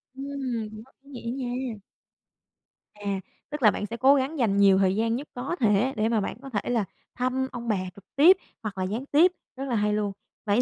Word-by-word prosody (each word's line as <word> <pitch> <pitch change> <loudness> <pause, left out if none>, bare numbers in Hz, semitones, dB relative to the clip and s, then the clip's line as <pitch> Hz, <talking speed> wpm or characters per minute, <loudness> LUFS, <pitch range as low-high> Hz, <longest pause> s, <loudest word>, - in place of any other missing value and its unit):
Ưm, 265 -5 -3 0.2
quá 265 - -25 0.2
ý 235 -2 -5
nghĩa 260 0 -3
nha. 245 -3 -3 1.1
À, 200 -2 -3 0.3
tức 295 -2 -5
là 215 - +8
bạn 205 - -3
sẽ 230 - -6
cố 270 +3 +6
gắng 275 +3 -1
dành 210 -5 +2
nhiều 200 -1 +6
thời 190 -1 +3
gian 225 +2 +1
nhất 275 +4 -5
có 255 +7 -3
thể 225 +2 +3
để 220 +1 +1
mà 225 -2 +2
bạn - - -4
có 275 - -8
thể 210 -2 -2
là 230 -5 +1 0.3
thăm 255 +1 0
ông 240 -1 -6
bà 215 -3 +2 0.2
trực 200 -2 -15
tiếp 340 +7 +7 0.3
hoặc 205 -3 -4
là 185 - -1
gián 215 +8 -3
tiếp, 315 +6 +5 0.2
rất 265 - -5
là 245 - 0
hay 210 -1 +2
luôn. 210 -1 0 0.3
Vậy 210 +3 +3
235 Hz, 220 wpm, -26 LUFS, 210-265 Hz, 1.1 s, là